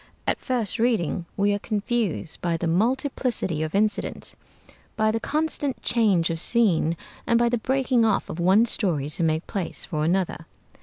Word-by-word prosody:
At - - 0
first 240 -4 -2
reading 195 -7 0
we 205 0 +2
are 205 - -1
confused 210 -5 -2
by 170 -1 0
the 170 - -3
multiplicity 230 - 0
of 155 +3 -3
incident, 215 +1 -1 0.6
by 215 0 +2
the 225 - -1
constant 300 0 -1
change 200 -9 +2
of 165 - -3
scene, 175 -6 +2 0.3
and 235 - +4
by 235 0 +3
the 240 -1 0
breaking 260 -1 +1
off 220 -3 +1
of 160 - -6
one 190 +6 +4
story 165 -11 0
to 155 - -1
make 160 0 +1
place 190 -4 -2
for 155 -4 -2
another. 175 -1 -1
205 Hz, 165 wpm, -24 LUFS, 170-235 Hz, 0.6 s, and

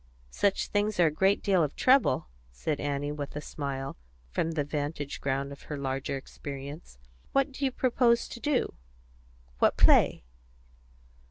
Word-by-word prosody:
"Such 200 -1 +1
things 205 -1 0
are 175 - +7
a 155 - +3
great 190 +6 +2
deal 190 -4 +3
of 150 - -2
trouble," 255 - +4 0.2
said 140 - -2
Annie, 145 0 -2
with 145 -1 -5
a - - -2
smile, 140 - -5 0.3
from 165 - -1
the 150 -2 0
vantage 145 0 -4
ground 140 0 -1
of 140 - -10
her 150 - -3
larger 135 0 -2
experience. 140 - -8 0.4
"What 275 0 +2
do 275 +1 -2
you 265 - +1
propose 240 -2 +2
to - - -8
do 290 0 0 0.9
what - - +3
play?" - - +5
150 Hz, 155 wpm, -29 LUFS, 140-205 Hz, 0.9 s, are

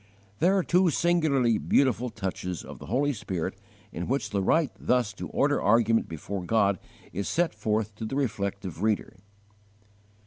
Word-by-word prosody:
There 190 +3 +4
are 190 - +2
two 180 +1 +3
singularly 150 -9 +2
beautiful 125 - +2
touches 95 -4 -4
of - - -10
the - - -10
Holy 140 +6 +1
Spirit 95 -7 -3 0.4
in 85 - -4
which 135 +3 -1
the 100 -2 0
right 155 - +2
thus 125 -4 +1
to - - -6
order - - +1
argument 115 +1 +3
before 90 +4 -5
God 100 -2 +2 0.3
is 100 +2 -2
set 170 +1 +1
forth 110 -1 -1
to 110 - -4
the 120 - -4
reflective 100 - -2
reader. 110 -1 0
110 Hz, 160 wpm, -27 LUFS, 100-140 Hz, 0.4 s, There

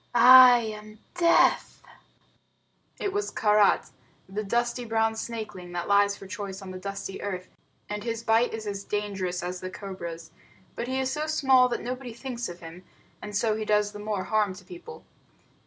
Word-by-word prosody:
I 250 +1 +9
am 215 -1 -8 0.2
Death!" 340 -1 +3 1.2
It 395 - -2
was 410 +1 -1
Karait, 210 - +2 0.4
the 205 +3 -4
dusty 240 +3 -1
brown 225 -1 0
snakeling 215 -6 -6
that 175 0 -3
lies 200 0 +3
for - - -11
choice 190 +1 -6
on 190 - -8
the 185 - -7
dusty 195 0 -6
earth; 185 -2 -5 0.4
and 210 0 -5
his 230 -1 -4
bite 230 +1 +3
is 220 -1 -6
as 200 -1 -4
dangerous 195 -4 -3
as 180 +1 -4
the 185 - -5
cobra's. 170 -4 -8 0.4
But 235 - -4
he 260 +1 -1
is 265 0 -1
so 305 0 -2
small 265 -5 +4
that 240 - -3
nobody 250 0 -5
thinks 240 -2 -5
of 175 0 -10
him, 165 +2 -11 0.4
and 205 -1 -4
so 220 0 +1
he 220 - -3
does 210 -1 +1
the 205 - -9
more 205 -2 -3
harm 210 -3 0
to 195 - -14
people. 360 +6 -11
210 Hz, 175 wpm, -26 LUFS, 195-240 Hz, 1.2 s, I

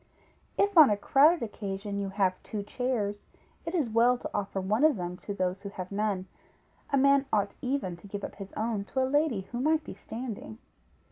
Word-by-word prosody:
If 400 -3 +4
on 300 - +10
a 205 - +2
crowded 290 +8 +4
occasion 200 -2 -4
you 200 -1 -2
have 190 -2 0
two 210 -2 -5
chairs, 210 -3 -2 0.4
it 330 - -2
is 305 -8 +1
well 235 +3 +4
to - - -6
offer 195 -1 -2
one 210 +7 +1
of 310 -3 +6
them 180 -2 -4
to 205 - -7
those 185 0 -1
who 200 - -6
have 185 -2 -7
none; 200 -2 -1 0.6
a 280 - +2
man 275 0 +4
ought 205 -2 +2
even 250 -9 -1
to 185 - -14
give 200 0 -6
up - - -6
his 195 -1 -8
own 220 -2 -1
to 260 +4 0
a - - +3
lady 285 -5 +1
who 240 - -3
might 310 +3 +2
be - - -8
standing. 225 -2 -7
215 Hz, 205 wpm, -29 LUFS, 200-265 Hz, 0.6 s, on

